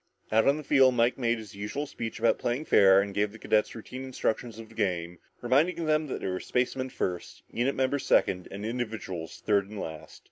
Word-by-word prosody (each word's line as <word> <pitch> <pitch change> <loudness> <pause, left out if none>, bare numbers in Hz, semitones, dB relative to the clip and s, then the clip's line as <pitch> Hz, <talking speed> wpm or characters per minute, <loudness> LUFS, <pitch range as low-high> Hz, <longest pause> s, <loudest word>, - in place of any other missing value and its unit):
Out 110 +3 +4
on 140 +2 +4
the 155 - -6
field 135 -3 +5
Mike 120 +2 +2
made 120 -1 +1
his 110 -3 -10
usual 105 +9 -4
speech 115 -5 -6
about 115 +1 +2
playing 125 +6 -1
fair 95 -6 +6
and 100 0 -6
gave 105 +1 0
the 110 - -11
cadets 110 -1 +1
the - - -9
routine 130 +4 -8
instructions 120 -3 -2
of 115 -1 -9
the - - -15
game, 90 -5 -2 0.2
reminding 155 +8 +2
them 155 0 +1
that 130 - -4
they - - -3
were 90 -1 -2
spacemen 130 +1 -1
first, 90 -7 -4
unit 125 +4 0
members 135 +1 0
second, 90 -1 +2
and 100 +2 -6
individuals 110 -8 -5
third 100 -2 +2
and 105 -1 -7
last. 80 -3 -8
115 Hz, 215 wpm, -28 LUFS, 100-130 Hz, 0.2 s, fair